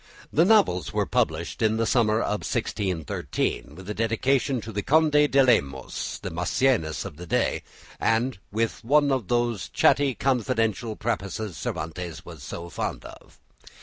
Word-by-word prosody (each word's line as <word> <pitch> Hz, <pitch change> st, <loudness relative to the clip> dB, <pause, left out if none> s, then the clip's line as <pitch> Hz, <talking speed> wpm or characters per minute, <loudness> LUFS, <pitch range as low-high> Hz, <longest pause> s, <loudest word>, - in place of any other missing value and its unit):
The 165 Hz, -, +5 dB
novels 195 Hz, -, +3 dB
were -, -, 0 dB
published 80 Hz, +6 st, -1 dB
in 110 Hz, 0 st, +2 dB
the 115 Hz, -, +1 dB
summer 110 Hz, -2 st, +2 dB
of 105 Hz, -1 st, -1 dB
1613, 80 Hz, -5 st, -2 dB
with 95 Hz, +2 st, -11 dB
a 105 Hz, -, -3 dB
dedication 125 Hz, +4 st, +1 dB
to 110 Hz, -, -7 dB
the 105 Hz, -1 st, -2 dB
Conde 155 Hz, +6 st, +3 dB, 0.2 s
de 135 Hz, 0 st, +5 dB
Lemos, 70 Hz, -, 0 dB
the -, -, -4 dB
Maecenas 90 Hz, -, +1 dB
of 75 Hz, -, -8 dB
the 90 Hz, +1 st, -9 dB
day, -, -, +1 dB, 0.4 s
and 115 Hz, 0 st, +1 dB
with 115 Hz, +3 st, -1 dB
one 145 Hz, +4 st, +4 dB
of 130 Hz, -8 st, 0 dB
those 120 Hz, -5 st, 0 dB
chatty 140 Hz, -3 st, +3 dB
confidential 115 Hz, -4 st, 0 dB
prefaces 105 Hz, -3 st, -3 dB
Cervantes 80 Hz, +2 st, -5 dB
was 85 Hz, -5 st, -10 dB
so 85 Hz, +5 st, -7 dB
fond 85 Hz, -, -4 dB
of. -, -, -13 dB
110 Hz, 150 wpm, -25 LUFS, 90-125 Hz, 0.4 s, The